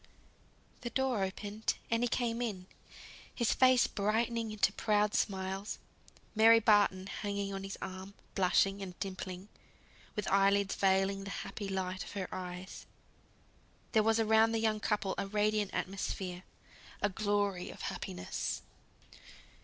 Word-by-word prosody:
The 240 Hz, -, -3 dB
door 260 Hz, -3 st, 0 dB
opened, 205 Hz, +3 st, -2 dB, 0.2 s
and 230 Hz, 0 st, +2 dB
he 245 Hz, -, +3 dB
came 235 Hz, -1 st, -1 dB
in; 200 Hz, -6 st, -3 dB, 0.7 s
his 235 Hz, -3 st, +2 dB
face 255 Hz, -1 st, +5 dB
brightening 225 Hz, +2 st, 0 dB
into 210 Hz, -2 st, +2 dB
proud 210 Hz, -1 st, +2 dB
smiles, 190 Hz, +1 st, -1 dB, 0.6 s
Mary 225 Hz, +1 st, +7 dB
Barton 205 Hz, -4 st, +4 dB
hanging 200 Hz, 0 st, -3 dB
on 195 Hz, 0 st, -4 dB
his 195 Hz, 0 st, -5 dB
arm, 190 Hz, +1 st, -7 dB, 0.2 s
blushing 195 Hz, +1 st, +3 dB
and 185 Hz, -2 st, -7 dB
dimpling, 185 Hz, -1 st, -5 dB, 0.7 s
with 210 Hz, -, -2 dB
eye 195 Hz, 0 st, +5 dB
lids 200 Hz, 0 st, +1 dB
veiling 195 Hz, 0 st, +2 dB
the 200 Hz, -, -6 dB, 0.2 s
happy 205 Hz, -2 st, -5 dB
light 185 Hz, -1 st, -2 dB
of -, -, -10 dB
her 190 Hz, -2 st, -3 dB
eyes, 180 Hz, 0 st, -7 dB, 1.0 s
there 220 Hz, -, +5 dB
was 225 Hz, +1 st, +3 dB
around 220 Hz, 0 st, +4 dB
the -, -, +2 dB
young 220 Hz, -1 st, +1 dB
couple 205 Hz, -2 st, 0 dB
a 200 Hz, -, -2 dB
radiant 210 Hz, 0 st, +1 dB
atmosphere 185 Hz, -1 st, -3 dB, 0.6 s
a -, -, +5 dB
glory 205 Hz, -2 st, 0 dB
of -, -, -10 dB
happiness. 90 Hz, 0 st, -4 dB
200 Hz, 135 wpm, -33 LUFS, 190-220 Hz, 1.0 s, Mary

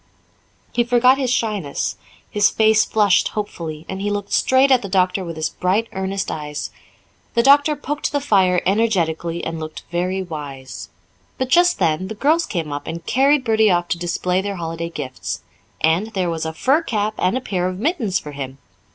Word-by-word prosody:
He 240 Hz, -, +2 dB
forgot 245 Hz, +2 st, +4 dB
his 260 Hz, -2 st, 0 dB
shyness; 210 Hz, -, -1 dB, 0.3 s
his 205 Hz, 0 st, +3 dB
face 220 Hz, 0 st, +4 dB
flushed 205 Hz, -3 st, +3 dB
hopefully, 165 Hz, -7 st, -5 dB
and 190 Hz, 0 st, -5 dB
he 205 Hz, -, -1 dB
looked 205 Hz, 0 st, -3 dB
straight 265 Hz, +1 st, +4 dB
at 255 Hz, -2 st, +5 dB
the 200 Hz, -, -6 dB
doctor 185 Hz, 0 st, +1 dB
with 170 Hz, -2 st, -6 dB
his 155 Hz, 0 st, -1 dB
bright, 195 Hz, +5 st, 0 dB
earnest 190 Hz, +1 st, -2 dB
eyes. 150 Hz, -1 st, -5 dB, 0.6 s
The 235 Hz, -, +4 dB
doctor 285 Hz, +3 st, +5 dB
poked 295 Hz, +1 st, -3 dB
the 285 Hz, -, +1 dB
fire 190 Hz, -9 st, +2 dB
energetically 170 Hz, -5 st, 0 dB
and 165 Hz, 0 st, -4 dB
looked 155 Hz, 0 st, -7 dB
very 185 Hz, +2 st, -1 dB
wise. 145 Hz, -6 st, -8 dB, 0.5 s
But 260 Hz, -1 st, -2 dB
just 350 Hz, +5 st, +4 dB
then 170 Hz, 0 st, +1 dB
the 220 Hz, -, -6 dB
girls 310 Hz, +9 st, +2 dB
came 165 Hz, -6 st, -3 dB
up 145 Hz, -, -6 dB
and 170 Hz, +1 st, -6 dB
carried 275 Hz, +3 st, +3 dB
Bertie 220 Hz, -2 st, +3 dB
off 175 Hz, -1 st, +1 dB
to 170 Hz, -, -1 dB
display 180 Hz, +1 st, 0 dB
their 200 Hz, 0 st, -4 dB
holiday 165 Hz, -1 st, -4 dB
gifts. 130 Hz, -, -5 dB, 0.4 s
And 165 Hz, +6 st, +2 dB
there 180 Hz, -3 st, 0 dB
was 160 Hz, -1 st, -3 dB
a 160 Hz, -, -4 dB
fur 270 Hz, -, +2 dB
cap 215 Hz, -8 st, -1 dB
and 185 Hz, +7 st, +1 dB
a -, -, 0 dB
pair 180 Hz, -6 st, -1 dB
of 185 Hz, 0 st, -4 dB
mittens 230 Hz, -, 0 dB
for 150 Hz, -, -7 dB
him! 135 Hz, -2 st, -6 dB
190 Hz, 185 wpm, -20 LUFS, 165-230 Hz, 0.6 s, at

